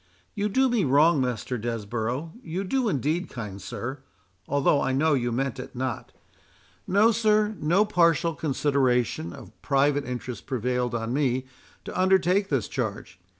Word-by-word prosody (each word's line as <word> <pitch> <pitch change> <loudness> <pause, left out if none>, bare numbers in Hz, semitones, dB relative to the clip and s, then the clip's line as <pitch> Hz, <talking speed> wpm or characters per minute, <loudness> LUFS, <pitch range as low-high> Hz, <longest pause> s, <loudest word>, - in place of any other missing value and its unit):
"You 205 +1 -1
do 265 +6 +3
me 240 -5 +1
wrong, 145 +2 +4
Master 125 0 -2
Desborough—you 120 - -4
do 245 +4 0
indeed, 155 - -1
kind 105 -5 -7
sir—although 115 - -2
I 135 - 0
know 155 +4 +3
you 120 -3 0
meant 135 +2 -2
it 130 - -8
not—No, 180 - -2
sir—no 210 -4 +2
partial 170 -4 +2
consideration 130 - 0
of - - -11
private 145 0 +2
interest 125 -1 -6
prevailed 125 -1 -1
on 115 +1 -2
me 130 -2 0 0.4
to - - -7
undertake 190 +1 +3
this 130 -8 0
charge. 105 -6 -4
135 Hz, 130 wpm, -26 LUFS, 120-175 Hz, 0.4 s, wrong